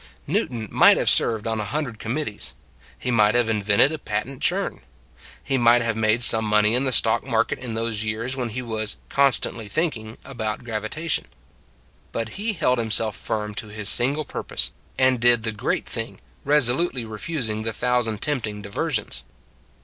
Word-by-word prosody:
Newton 115 - -2
might - - +6
have - - +4
served 110 -2 +2
on 110 -1 -1
a - - -1
hun 145 +9 -2
dred 115 -6 -8
committees; 115 -2 -4 0.4
he 125 - -3
might 105 -1 +4
have 120 -2 +2
invented 105 +5 +3
a 160 - -5
patent 135 -1 -4
churn; - - 0 0.6
he 135 -2 0
might 120 0 +5
have 115 -1 -1
made 110 +2 +2
some 110 -2 +8
money 105 0 +3
in 125 +3 +2
the 130 - 0
stock - - +4
market - - 0
in 120 -3 -5
those 115 -2 -1
years 110 +4 -3
when 125 -3 -3
he 125 +3 -5
was 110 -2 -3
" - - -32
constantly 125 -5 +1
thinking 110 -4 -2
" - - -27
about 115 -4 -4
gravitation. 120 +8 -3 0.9
But 115 -1 -3
he 215 - -2
held 130 -8 +1
himself 110 -2 0
firm 105 -1 -3
to 105 - -5
his 105 -1 -2
single 145 +5 +2
purpose, - - -2 0.2
and 130 -1 +3
did 120 -1 +4
the 110 - -1
great 105 - -2
thing, - - -5 0.2
resolutely 135 -1 +2
refusing 110 0 -4
the 115 +1 -2
thousand 120 -2 -1
tempting 110 -8 -3
diversions. 110 - -2
115 Hz, 175 wpm, -23 LUFS, 110-130 Hz, 0.9 s, some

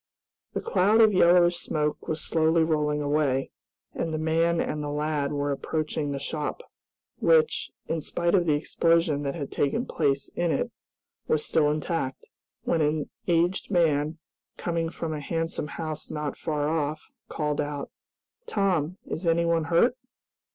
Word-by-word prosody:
The - - -2
cloud 220 - +3
of 220 -2 +6
yellowish 175 -1 +5
smoke 150 -3 -2
was 160 0 -1
slowly 160 +1 +2
rolling 150 -2 +1
away, 145 -2 +1 0.4
and 165 - -2
the 155 - -1
man 165 +2 +2
and 150 - -1
lad 150 0 -1
were 145 0 -1
approaching 150 +1 -2
the 140 - -2
shop, 150 - -4 0.6
which, 475 -1 +3 0.2
in 165 -1 -1
spite 170 +3 -1
of 180 -3 +3
the 150 - +4
explosion 165 0 +2
that 140 -1 -2
had 145 -5 -5
taken 230 - 0
place 140 -3 0
in 175 -1 -1
it, - - -1 0.6
was 155 - +1
still 150 -2 +3
intact, 150 -3 -2 0.4
when 165 - +1
an 150 0 0 0.2
aged 175 +2 +1
man, 155 -4 +2 0.4
coming 165 -1 -1
from 165 -1 -4
a 150 - -3
handsome 165 +1 -2
house 155 0 -5
not 150 -1 -3
far 150 -2 -2
off, 155 -1 -2 0.2
called 150 -2 -1
out, 145 -1 -4 0.6
"Tom, 185 -5 0
is 170 +2 -4
anyone 165 -1 +2
hurt?" 180 +10 +3
155 Hz, 150 wpm, -26 LUFS, 150-170 Hz, 0.6 s, of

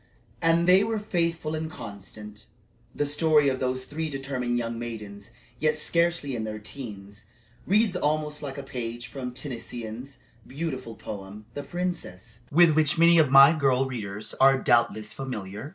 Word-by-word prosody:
And 165 +1 +3
they 185 +2 +6
were 220 +1 -1
faithful 170 -6 -1
and 160 0 -3
constant. 105 -2 -10 0.5
The 145 - 0
story 150 0 +3
of 130 -1 -2
those 130 0 -2
three 160 +3 -4
determined 135 -3 -2
young 115 -1 -3
maidens, 105 -3 -7 0.3
yet 155 0 +2
scarcely 170 -3 0
"in 110 - -3
their 110 0 -4
teens," 105 -3 -9 0.4
reads 205 0 +3
almost 150 -2 -1
like 140 -2 -6
a 140 - -5
page 120 -3 -5
from 130 -2 -6
Tennyson's 125 -1 -7 0.3
beautiful 130 -5 -5
poem, 100 +1 -8
"The 145 - -4
Princess," 135 - -5
with 170 +2 +6
which 155 -1 +2
many 170 0 +6
of 150 -4 +4
my 140 +3 +9
girl 135 -4 +2
readers 105 -4 -3
are 135 0 +7
doubtless 115 -3 +2
familiar. 110 -2 -6
135 Hz, 150 wpm, -26 LUFS, 115-155 Hz, 0.5 s, my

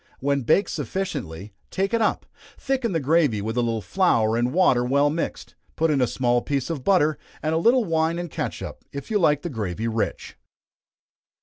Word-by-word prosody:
When 140 +1 0
baked 165 - +2
sufficiently, 130 - -4 0.2
take 195 +3 -1
it 230 - +2
up, 215 - 0 0.3
thicken 260 -4 -1
the 165 - 0
gravy 145 -6 +2
with 110 +3 -3
a 120 - +2
little 115 -2 -1
flour 115 - +2
and 120 +1 +1
water 135 -8 +3
well 140 +3 +2
mixed, 165 +2 -4 0.2
put 160 0 +2
in 140 -3 +2
a 125 - +3
small 120 -1 +1
piece 140 +3 -2
of 145 -6 -4
butter, 155 -4 +3 0.2
and 155 +1 0
a 160 - +2
little 235 +6 +4
wine 165 -1 +1
and 175 -2 -5
catsup, - - -5
if 140 - -7
you 210 - +2
like 150 -5 +2
the 175 - -3
gravy 110 -2 -3
rich. 115 -1 -3
145 Hz, 190 wpm, -24 LUFS, 120-175 Hz, 0.3 s, little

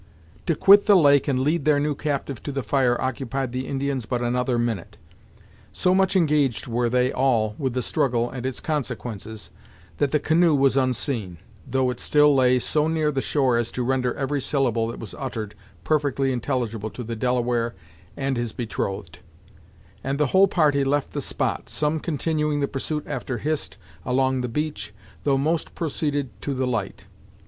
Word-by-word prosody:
To 165 - +2
quit 200 +6 +6
the 205 - +7
lake 145 -6 +5
and 130 -2 +1
lead 150 +3 +1
their 150 -1 +3
new 150 +1 0
captive 140 -4 -3
to 145 - -5
the 135 -1 -3
fire 120 +1 +2
occupied 130 0 -2
the 130 +1 -4
Indians 135 -4 -2
but 125 0 -1
another 125 +1 0
minute. 115 -6 -2 0.8
So 180 - +2
much 190 0 +2
engaged 150 - +2
were 120 0 0
they 125 +1 +2
all 115 -5 +2
with 130 -4 -2
the 125 - 0
struggle 120 -5 0
and 125 -1 -7
its 130 -1 -3
consequences, 115 -8 -4 0.5
that 145 - +2
the 150 - +2
canoe 160 +1 +3
was 135 -1 +3
unseen, 125 - -1 0.3
though 130 0 +1
it 125 - -7
still 150 0 +4
lay 130 -1 +4
so 150 +5 0
near 160 -2 +1
the 135 -2 -1
shore 130 -5 +1
as 120 -1 -1
to 125 - -2
render 125 0 0
every 140 +1 -1
syllable 120 -5 +1
that 115 - -6
was 110 - -8
uttered 115 -6 -4 0.3
perfectly 140 -3 +1
intelligible 120 -4 -2
to 125 - -7
the 115 0 -5
Delaware 120 0 0 0.4
and 135 -2 -1
his 120 -2 -3
betrothed; 105 -4 -4 0.8
and 135 +1 -2
the 150 - +3
whole 195 +1 +6
party 150 -7 +2
left 140 +1 0
the - - -3
spot, - - -2
some 150 +1 0
continuing 150 -1 -1
the 140 - +1
pursuit 150 +3 -3
after 130 - -4
Hist, 150 +2 -3 0.3
along 130 +1 +1
the 125 - -2
beach, 115 -7 -4 0.3
though 140 -2 +3
most 160 +4 -1
proceeded 145 -4 -2
to 140 - -3
the 130 0 0
light. 115 -6 -3
135 Hz, 175 wpm, -24 LUFS, 120-145 Hz, 0.8 s, the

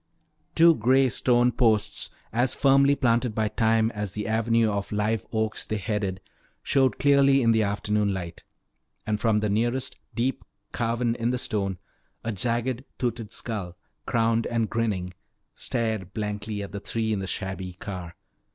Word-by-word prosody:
Two 165 0 +7
gray 130 +1 +3
stone 120 +2 +3
posts, 110 -4 +1 0.2
as 120 +2 +1
firmly 140 +1 +4
planted 120 -3 +1
by 110 -1 +1
time 110 0 +2
as 105 -4 -4
the 105 -1 -4
avenue 115 +1 +2
of 100 -1 -2
live 105 0 -1
oaks 110 -1 -1
they 110 - -3
headed, 100 -2 -2 0.4
showed 135 -5 +2
clearly 140 -1 +4
in 115 - +4
the 110 -1 +3
afternoon 105 0 0
light. 90 -3 -5 0.6
And 105 -1 -1
from 110 -2 +2
the 105 - +1
nearest, 120 +5 -1 0.2
deep 125 +3 -1 0.3
carven 115 0 0
in 115 0 -1
the 125 - 0
stone, 100 -6 -2 0.5
a 115 - -2
jagged 120 +4 -1
toothed 115 -4 -3
skull, 95 -8 -5 0.3
crowned 115 0 +2
and 115 -2 -1
grinning, 100 -6 -1 0.4
stared 110 -5 -3
blankly 105 -1 -3
at 100 - -8
the 100 - -5
three 110 +1 -2
in 100 - -1
the 95 - -4
shabby 95 -1 -4
car. 90 -2 -7
110 Hz, 155 wpm, -26 LUFS, 105-120 Hz, 0.6 s, Two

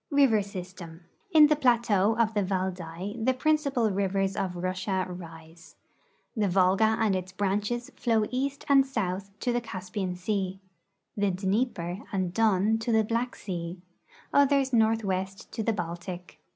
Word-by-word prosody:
EIVER 270 -7 +4
SYSTEM. 180 -3 -9 0.3
In 315 -5 +8
the 300 0 +4
plateau 230 -6 +2
of 230 -1 +2
the 205 - +1
Valdai 185 +2 -3
the 260 +2 +2
principal 280 -5 +1
rivers 195 0 0
of 185 -2 -2
Russia 185 +1 -2
rise. 165 -2 -11 0.6
The 210 -3 +1
Volga 195 +4 +3
and 215 -4 +2
its 185 0 -4
branches 205 +5 -2
flow 225 -3 +1
east 275 +2 -2
and 275 -2 +6
south 195 -7 -3
to 245 - 0
the 240 - 0
Caspian 185 -3 -4
sea; 190 0 -2 0.6
the 205 -1 +1
Dnieper 190 -1 -1
and 185 -3 -1
Don 220 0 +2
to 235 +1 -2
the 220 -1 +4
Black 235 +3 -2
sea; 175 -2 -5 0.5
others 275 -2 +3
northwest 200 -4 0
to - - -3
the 225 - +1
Baltic. 175 -1 -6
200 Hz, 145 wpm, -28 LUFS, 185-230 Hz, 0.6 s, In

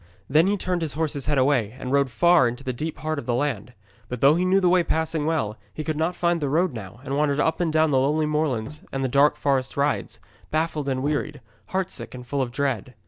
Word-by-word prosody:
Then 155 +6 +4
he 205 +1 +1
turned 180 -2 -2
his 155 -4 -3
horse's 150 -3 -2
head 145 -1 +1
away 130 -5 +2
and 125 - -5
rode 140 -1 +3
far 170 +2 +4
into 120 +3 -5
the 130 -2 -2
deep 155 +6 -4
heart 155 -1 -2
of - - -9
the 120 - +1
land. 125 -4 -2 0.4
But 125 - -4
though 140 +4 +6
he 175 +3 +1
knew 190 +1 +4
the 185 - +2
way 180 0 +5
passing 160 -2 -1
well, 110 -11 -1 0.2
he 155 - -4
could 155 0 -2
not 160 +3 -1
find 170 -1 +1
the 145 - 0
road 170 +3 +1
now, 110 +1 -9
and 140 0 -3
wandered 145 -1 +1
up 160 - +1
and 165 -2 +1
down 155 0 +3
the 135 - +4
lonely 150 +4 +1
moorlands 150 -3 -2
and 135 0 -2
the - - +1
dark 140 +3 +4
forest 135 -2 -1
rides, 140 +1 -1 0.3
baffled 155 -2 -1
and 130 -1 -1
wearied, 150 0 -2 0.3
heartsick 190 -7 -4
and 125 -1 -9
full 140 +2 -1
of 125 -2 -2
dread. 130 -3 -2
145 Hz, 245 wpm, -24 LUFS, 130-160 Hz, 0.4 s, though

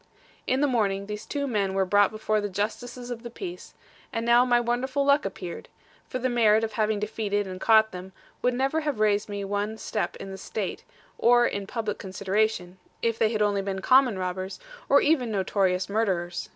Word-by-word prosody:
In 260 +2 +1
the 290 - +4
morning, 200 -6 0
these 210 +1 -7
two 285 -1 -2
men 200 -7 -1
were 195 0 +2
brought 205 +1 +4
before 215 0 -1
the 205 - -3
Justices 245 +5 -4
of 235 -1 -5
the 235 - -7
Peace: 355 +9 -8 0.4
and 230 0 -2
now 235 +1 +6
my 245 -1 +3
wonderful 255 +4 0
luck 280 +1 +4
appeared; 190 -3 -6 0.4
for 255 - -2
the 255 +1 0
merit 225 -3 +4
of 220 - -1
having 215 -1 0
defeated, 205 -1 -1
and 185 0 -7
caught 220 -1 +5
them, 185 +1 -8 0.3
would 250 0 +1
never 270 +5 +1
have 295 -7 -2
raised 210 -1 +2
me 200 -1 -4
one 205 +2 -2
step 215 - -3
in 195 - -8
the 190 - -8
State, 195 0 -4 0.4
or 240 0 +5
in 200 -4 -2
public 215 -2 -3
consideration, 190 -1 -1 0.2
if 230 -1 0
they 220 - +4
had 215 -2 +1
only 205 -1 +1
been 195 -1 -3
common 255 0 +4
robbers, 185 +1 -4 0.3
or 280 - +6
even 290 -6 +2
notorious 190 -2 0
murderers. 190 -5 -1
215 Hz, 195 wpm, -26 LUFS, 195-240 Hz, 0.4 s, now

